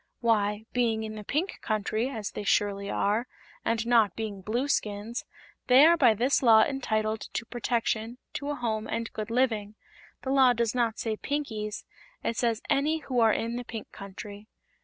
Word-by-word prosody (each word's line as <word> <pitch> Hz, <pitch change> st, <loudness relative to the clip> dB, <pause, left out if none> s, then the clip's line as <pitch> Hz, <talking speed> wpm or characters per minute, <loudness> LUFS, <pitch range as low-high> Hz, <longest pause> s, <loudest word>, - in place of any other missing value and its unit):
"Why, 210 Hz, -2 st, +1 dB
being 230 Hz, -3 st, +1 dB
in 215 Hz, 0 st, -5 dB
the 215 Hz, -1 st, -7 dB
Pink 310 Hz, -, -2 dB
Country, 215 Hz, +3 st, -1 dB
as 220 Hz, -7 st, -5 dB
they -, -, -5 dB
surely 200 Hz, 0 st, +1 dB
are, 215 Hz, +6 st, 0 dB, 0.4 s
and 230 Hz, 0 st, 0 dB
not 230 Hz, -5 st, +4 dB
being 210 Hz, -3 st, -5 dB
Blueskins, 220 Hz, -1 st, -2 dB, 0.4 s
they 260 Hz, +4 st, +8 dB
are 335 Hz, +1 st, +7 dB
by 245 Hz, -9 st, +5 dB
this 250 Hz, +6 st, +2 dB
Law 225 Hz, -4 st, +7 dB
entitled 220 Hz, -6 st, -1 dB
to 235 Hz, -, -2 dB
protection, 235 Hz, -1 st, -1 dB, 0.2 s
to 285 Hz, 0 st, -4 dB
a 290 Hz, -, -1 dB
home 220 Hz, -4 st, -2 dB
and 230 Hz, 0 st, -3 dB
good 215 Hz, +1 st, -4 dB
living. 225 Hz, -4 st, 0 dB, 0.5 s
The 265 Hz, -, -2 dB
Law 265 Hz, -2 st, +6 dB
does 235 Hz, -2 st, 0 dB
not 235 Hz, -3 st, 0 dB
say 220 Hz, -2 st, -2 dB
'Pinkies,' 220 Hz, -8 st, -3 dB, 0.4 s
it 230 Hz, -, -1 dB
says 230 Hz, -2 st, 0 dB
any 305 Hz, +3 st, +1 dB
who 255 Hz, -4 st, -1 dB
are 225 Hz, -1 st, +5 dB
in 230 Hz, +2 st, -1 dB
the 245 Hz, -, -4 dB
Pink 225 Hz, -2 st, -8 dB
Country." 200 Hz, +1 st, -9 dB
225 Hz, 175 wpm, -28 LUFS, 215-245 Hz, 0.5 s, they